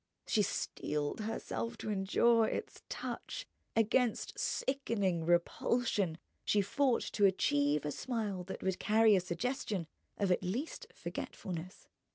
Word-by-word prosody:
She 215 Hz, -, +3 dB
steeled 150 Hz, -5 st, -2 dB
herself 225 Hz, +1 st, -3 dB
to 215 Hz, -, -3 dB
endure 220 Hz, +3 st, +4 dB
its -, -, -4 dB
touch, -, -, -5 dB, 0.3 s
against 225 Hz, +2 st, +2 dB
sickening 205 Hz, -11 st, 0 dB
repulsion 175 Hz, +1 st, +2 dB, 0.3 s
she 205 Hz, -, +3 dB
fought 255 Hz, +5 st, +2 dB
to 205 Hz, -, +4 dB
achieve 145 Hz, -5 st, +2 dB
a 150 Hz, -, -1 dB
smile 210 Hz, -, -2 dB
that 190 Hz, -, -6 dB
would 190 Hz, -1 st, 0 dB
carry 220 Hz, 0 st, +5 dB
a -, -, +5 dB
suggestion 190 Hz, 0 st, -2 dB, 0.3 s
of 200 Hz, -3 st, +1 dB
at 180 Hz, -, +3 dB
least 235 Hz, -, -3 dB
forgetfulness. 180 Hz, -1 st, -6 dB
205 Hz, 125 wpm, -34 LUFS, 180-230 Hz, 0.3 s, carry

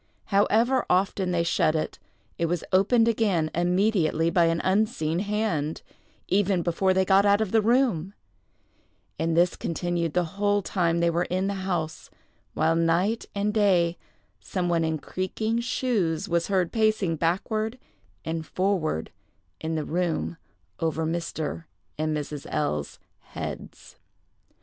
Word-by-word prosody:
However 225 Hz, +6 st, +3 dB
often 190 Hz, 0 st, +1 dB
they 175 Hz, -1 st, +1 dB
shut 160 Hz, -2 st, +2 dB
it, 155 Hz, -, -3 dB, 0.4 s
it 170 Hz, -, +1 dB
was 175 Hz, -1 st, -1 dB
opened 225 Hz, +5 st, +4 dB
again 200 Hz, -9 st, +1 dB
immediately 175 Hz, -2 st, +2 dB
by 175 Hz, -2 st, +4 dB
an 165 Hz, 0 st, +1 dB
unseen 190 Hz, -5 st, +1 dB
hand, 200 Hz, -7 st, -1 dB, 0.4 s
even 190 Hz, -2 st, +2 dB
before 180 Hz, +3 st, +1 dB
they 190 Hz, 0 st, +2 dB
got 195 Hz, +1 st, +5 dB
out 200 Hz, 0 st, +4 dB
of 215 Hz, -4 st, -1 dB
the 225 Hz, -, +4 dB
room; 215 Hz, -6 st, +1 dB, 1.0 s
and 165 Hz, 0 st, 0 dB
this 175 Hz, +1 st, +3 dB
continued 170 Hz, -1 st, -2 dB
the 180 Hz, -, +3 dB, 0.2 s
whole 205 Hz, 0 st, +2 dB
time 170 Hz, -3 st, 0 dB
they 170 Hz, 0 st, +3 dB
were 170 Hz, +1 st, 0 dB
in 185 Hz, +1 st, -1 dB
the 200 Hz, -, -1 dB
house; 175 Hz, -5 st, -3 dB, 0.5 s
while, 160 Hz, +1 st, +2 dB
night 170 Hz, +7 st, +1 dB
and 205 Hz, +1 st, 0 dB
day, 180 Hz, -5 st, +3 dB, 0.4 s
some 175 Hz, -, -2 dB
one 170 Hz, -1 st, +2 dB
in 160 Hz, -1 st, 0 dB
creaking 215 Hz, +8 st, -2 dB
shoes 225 Hz, -9 st, -1 dB
was 170 Hz, -1 st, 0 dB
heard 185 Hz, -4 st, +1 dB
pacing 215 Hz, -6 st, +1 dB
backward 215 Hz, -, -1 dB, 0.5 s
and 160 Hz, 0 st, -3 dB
forward 185 Hz, -, -1 dB, 0.5 s
in 160 Hz, 0 st, -3 dB
the 155 Hz, -, -2 dB
room 160 Hz, -, -1 dB, 0.4 s
over 160 Hz, 0 st, -1 dB
Mr. 165 Hz, -1 st, -3 dB, 0.3 s
and 155 Hz, 0 st, 0 dB
Mrs. 150 Hz, -1 st, -6 dB
L——'s 75 Hz, -, -2 dB, 0.2 s
heads. -, -, -8 dB
175 Hz, 140 wpm, -26 LUFS, 165-205 Hz, 1.0 s, got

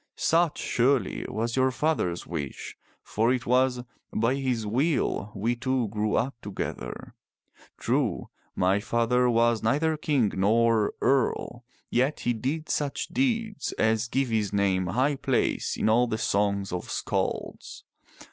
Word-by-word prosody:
Such, 165 Hz, -1 st, +2 dB
surely, 125 Hz, -3 st, 0 dB
was 115 Hz, +3 st, -2 dB
your 130 Hz, 0 st, +3 dB
father's 130 Hz, -, -1 dB
wish, 75 Hz, -6 st, -6 dB, 0.3 s
for 115 Hz, +3 st, +1 dB
it 125 Hz, -2 st, -1 dB
was 125 Hz, 0 st, +2 dB, 0.3 s
by 115 Hz, +3 st, +1 dB
his 130 Hz, -5 st, -1 dB
will 120 Hz, -3 st, 0 dB
we 115 Hz, +5 st, 0 dB
two 130 Hz, -2 st, -1 dB
grew 105 Hz, 0 st, -1 dB
up 130 Hz, +4 st, 0 dB
together. 100 Hz, -1 st, -6 dB, 0.6 s
True, -, -, -1 dB, 0.3 s
my 95 Hz, +2 st, +2 dB
father 120 Hz, +3 st, +1 dB
was 115 Hz, -1 st, +2 dB
neither 155 Hz, +8 st, +1 dB
king 140 Hz, -8 st, +1 dB
nor 110 Hz, +2 st, +2 dB
earl, 125 Hz, -2 st, 0 dB, 0.3 s
yet 130 Hz, +5 st, +1 dB
he 120 Hz, -, +1 dB
did 140 Hz, +8 st, -3 dB
such 145 Hz, -2 st, -2 dB
deeds 230 Hz, -5 st, -1 dB
as 110 Hz, +1 st, +1 dB
give 130 Hz, +2 st, 0 dB
his 110 Hz, -3 st, 0 dB
name 95 Hz, -2 st, +1 dB
high 130 Hz, +9 st, +1 dB
place 135 Hz, -2 st, 0 dB
in -, -, 0 dB
all 120 Hz, +3 st, +4 dB
the 110 Hz, -, -2 dB
songs 100 Hz, -2 st, 0 dB
of 90 Hz, -, -4 dB
skalds. -, -, -3 dB
120 Hz, 140 wpm, -27 LUFS, 105-135 Hz, 0.6 s, all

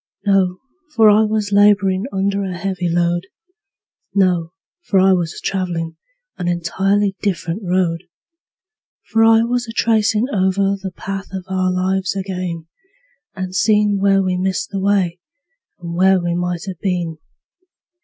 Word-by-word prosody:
No 190 Hz, -2 st, +2 dB, 0.4 s
for 220 Hz, -2 st, +6 dB
I 210 Hz, +1 st, +5 dB
was 215 Hz, -1 st, -1 dB
laborin' 200 Hz, -1 st, +3 dB
under 200 Hz, +1 st, -1 dB
a 185 Hz, -2 st, -4 dB
heavy 185 Hz, -1 st, -2 dB
load; 175 Hz, +2 st, 0 dB, 0.9 s
No 180 Hz, -4 st, +2 dB, 0.3 s
for 195 Hz, -, +1 dB
I 190 Hz, +1 st, +5 dB
was 170 Hz, -3 st, -2 dB
travelin' 170 Hz, -4 st, -2 dB, 0.4 s
an 175 Hz, -, -2 dB
entirely 190 Hz, +4 st, 0 dB
different 185 Hz, -1 st, -2 dB
road; 175 Hz, -2 st, 0 dB, 1.1 s
For 225 Hz, 0 st, +4 dB
I 225 Hz, 0 st, +5 dB
was 240 Hz, 0 st, -1 dB
a -, -, -6 dB
tracin' 220 Hz, -1 st, +2 dB
over 195 Hz, 0 st, +1 dB
the 190 Hz, -, -4 dB
path 195 Hz, +2 st, -6 dB
of 190 Hz, -2 st, -5 dB
our 185 Hz, -1 st, 0 dB
lives 185 Hz, +1 st, -1 dB
ag'in, 180 Hz, -4 st, -4 dB, 0.7 s
And 185 Hz, -1 st, -5 dB
seein' 210 Hz, 0 st, +2 dB
where 195 Hz, 0 st, +3 dB
we 185 Hz, -1 st, 0 dB
missed 190 Hz, +1 st, -1 dB
the 195 Hz, -, -2 dB
way, 190 Hz, -3 st, +1 dB, 0.6 s
and 170 Hz, -1 st, -6 dB
where 190 Hz, +2 st, +4 dB
we 175 Hz, -1 st, -2 dB
might 175 Hz, 0 st, -2 dB
have 185 Hz, -3 st, -7 dB
been. 175 Hz, -4 st, -2 dB
190 Hz, 145 wpm, -19 LUFS, 180-200 Hz, 1.1 s, for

